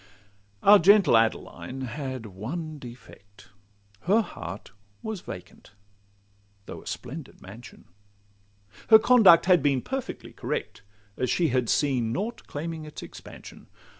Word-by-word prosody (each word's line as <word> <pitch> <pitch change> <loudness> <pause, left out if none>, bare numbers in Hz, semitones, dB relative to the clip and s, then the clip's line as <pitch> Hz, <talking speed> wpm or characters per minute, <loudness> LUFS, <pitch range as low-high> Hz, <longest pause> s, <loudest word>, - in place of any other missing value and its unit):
Our 205 +1 +8
gentle 195 - +5
Adeline 115 +3 -1
had 130 -1 -5
one 145 - -6
defect— 105 -6 -14 0.6
Her 210 +5 +4
heart 95 - -9 0.3
was 220 -4 -5
vacant, 90 +2 -11 0.9
though - - -9
a - - -16
splendid 135 +4 -7
mansion; 110 +6 -13 1.0
Her 220 - +9
conduct 220 -7 +6
had 180 -3 +5
been 135 -3 +1
perfectly 270 -1 -6
correct, - - -5 0.4
As 125 - -1
she 170 -3 +1
had 125 -2 0
seen 130 -6 +1
nought 210 - -4
claiming 160 +2 -5
its 150 0 -9
expansion. - - -12
140 Hz, 120 wpm, -26 LUFS, 120-180 Hz, 1.0 s, Her